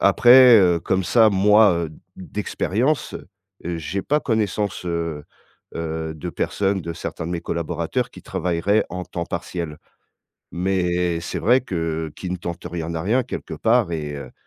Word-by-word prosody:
après, 125 -1 +7
heu, 90 -4 +3
comme 95 +1 0
ça 110 0 +5
moi, 105 +1 +5
heu, - - -11 0.3
d'expérience, 105 +7 -2 0.5
heu, 85 0 -3
j'ai 95 +5 -3
pas 150 +7 +1
connaissance, 105 -5 -1
heu 85 -3 -3 0.5
heu, 80 -1 -4
de 85 +3 -6
personnes, 95 +2 -1
de 85 0 -5
certains 80 -1 -6
de 85 - -4
mes 85 - -2
collaborateurs 85 +10 -2
qui - - -13
travailleraient, 90 +5 0
en 90 +1 -5
temps 85 -1 -5
partiel, 80 -2 -5 0.7
mais 90 -1 0
c'est 85 - -4
vrai 125 +5 +4
que 80 - -3
«qui 90 - -5
ne 90 - -1
tente 85 0 -6
rien, 85 -1 -4
n'a 85 -1 -3
rien» 120 +6 +2
quelque - - -6
part 115 -5 +2
et 75 -2 -4
heu, 70 - -8
90 Hz, 160 wpm, -22 LUFS, 85-105 Hz, 0.7 s, après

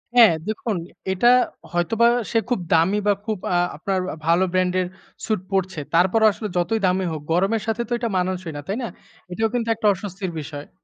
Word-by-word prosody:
হ্যাঁ, 225 -8 +8
দেখুন 215 0 -2 0.4
এটা 215 +6 +2 0.4
হয়তোবা 210 +7 +2 0.2
সে 230 - +2
খুব 245 - +1
দামি 170 +6 +4
বা 205 - +5
খুব 215 -3 -1 0.2
আ - - +2 0.2
আপনার 190 +4 -1
আ - - -6
ভালো 170 +3 +4
brand 185 -1 +1
এর 180 - -2 0.4
suit 215 -5 0
পরছে। 190 -4 -1
তারপরও 190 +6 +4
আসলে 215 - -5
যতই 220 +6 +1
দামি 185 0 +1
হোক, 155 -2 -4
গরমের 195 +6 +2
সাথে 225 +1 0
তো - - -20
এটা 235 -1 -2
মানানসই 180 -2 -2
না। - - -5
তাই 200 +4 -2
না? - - -2 0.4
এটাও 220 +4 0
কিন্তু 235 -2 -1
একটা 215 -1 0
অস্বস্তির 190 -1 -5
বিষয়। 145 -1 -8
190 Hz, 195 wpm, -22 LUFS, 175-220 Hz, 0.4 s, হ্যাঁ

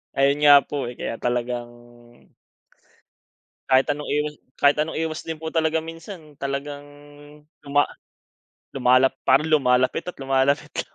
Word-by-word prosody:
Ayun 140 +1 +2
nga 145 -1 +8
po, 140 -4 -4
eh, 120 - -7
kaya 115 - -5
talagang 120 0 -2 2.0
kahit 130 0 +5
anong 145 0 -5
iwas 150 +1 -1 0.2
kahit 145 +1 +4
anong 155 +1 -1
iwas 160 0 -3
din 160 - -3
po 160 0 -6
talaga 160 0 +1
minsan 165 -1 -10
talagang 145 +1 -4 0.7
tuma 145 0 +2 0.9
lumalap 130 0 +3
parang 135 +4 +4
lumalapit 130 0 +2
at 180 - -6
lumalapit 135 +1 +1
lang. - - -6
145 Hz, 130 wpm, -23 LUFS, 130-155 Hz, 2.0 s, nga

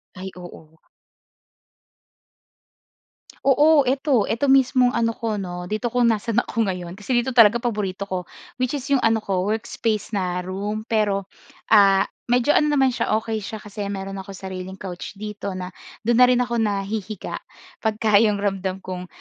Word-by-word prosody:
Ay, 190 +1 -6
oo 175 -3 -11
nga. 160 - -30 2.6
Oo, 290 0 +5
'eto. 265 -4 +2
'Eto 265 +4 +1
mismong 255 -2 +4
ano 230 -1 0
ko 220 -3 -2
'no, 180 -1 -5
dito 215 +6 -2
kung 240 0 +3
nasaan 225 +2 0
ako 225 -3 -1
ngayon. 180 -2 -4
Kasi 245 +4 -1
dito 240 +2 +1
talaga 230 -3 +6
paborito 200 -4 -2
ko, 185 -3 -4 0.3
which 255 +2 0
is 280 - -4
'yong 275 - +4
ano 225 -2 +2
ko, 190 -1 -1
workspace 220 0 -2
na 180 -3 -1
room. 205 +4 -4
Pero 210 -3 0 0.5
ah, 195 -2 +6 0.2
medyo 245 +4 +3
ano 300 - +3
naman 270 -3 +3
siya, 215 - 0
okey 220 0 -2
siya 215 +1 -7
kasi 205 -1 -5
meron 195 0 -5
ako 195 0 -8
sariling 190 -1 -7
couch 190 +1 -7
dito 205 -2 -6
na 180 0 -6 0.3
do'n 235 +2 +2
na 250 - +8
rin 250 -1 +3
ako 235 -1 -2
nahihiga 205 -1 -3 0.4
pagka 215 -1 +3
'yong 210 -2 +3
ramdam 190 -1 -2
kong 180 -1 -6
210 Hz, 160 wpm, -23 LUFS, 195-235 Hz, 2.6 s, na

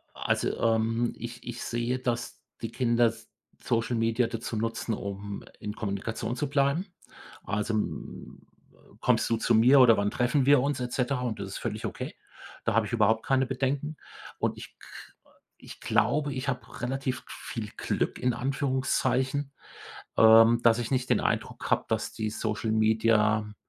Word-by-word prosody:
Also, - - -1
ähm, 115 +1 +1
ich 120 0 -8
ich 120 -1 -6
sehe, 120 +2 -2
dass 120 -2 -3 0.2
die 115 - -4
Kinder 120 -1 +3
S 115 0 -7 0.3
Social 115 +1 0
Media 115 +1 +1
dazu 115 0 -5
nutzen, 115 +1 -2
um 100 0 -5 0.2
in 105 0 -5
Kommunikation 110 +3 -3
zu 145 - -2
bleiben. 140 +5 +1 0.6
Also, 105 +2 -2
mm, 105 - -5 0.3
äh: - - -22
„Kommst - - +2
du 115 - +3
zu 115 - +1
mir 125 +5 +6
oder 115 -3 +7
wann 100 0 0
treffen 125 +2 +1
wir 140 -1 +6
uns“, 140 0 -1
et 125 -1 -4
cetera? 125 0 0
Und 120 -4 -3
das 100 - -4
ist - - -5
völlig - - -4
okay. - - -5 0.5
Da - - 0
habe 115 -1 +3
ich 110 - -7
überhaupt 110 0 +2
keine 135 -1 +2
Bedenken. 140 +4 -2 0.4
Und - - -1
ich - - -11
k - - -14 0.7
ich - - -12
glaube, 145 -2 +1
ich 130 +2 -3
habe 125 -3 -5
relativ 130 +1 -2
viel 110 -3 -6
Glück - - -1
in 125 -1 +1
Anführungszeichen, 130 +1 0 0.6
ähm, 115 +1 +7
dass 115 0 +5
ich 115 - -4
nicht 130 -2 0
den - - +3
Eindruck - - -2
habe, - - +2
dass - - -1
die 110 -1 -3
Social 110 0 -2
Media 110 -1 +2
120 Hz, 165 wpm, -28 LUFS, 110-130 Hz, 0.7 s, oder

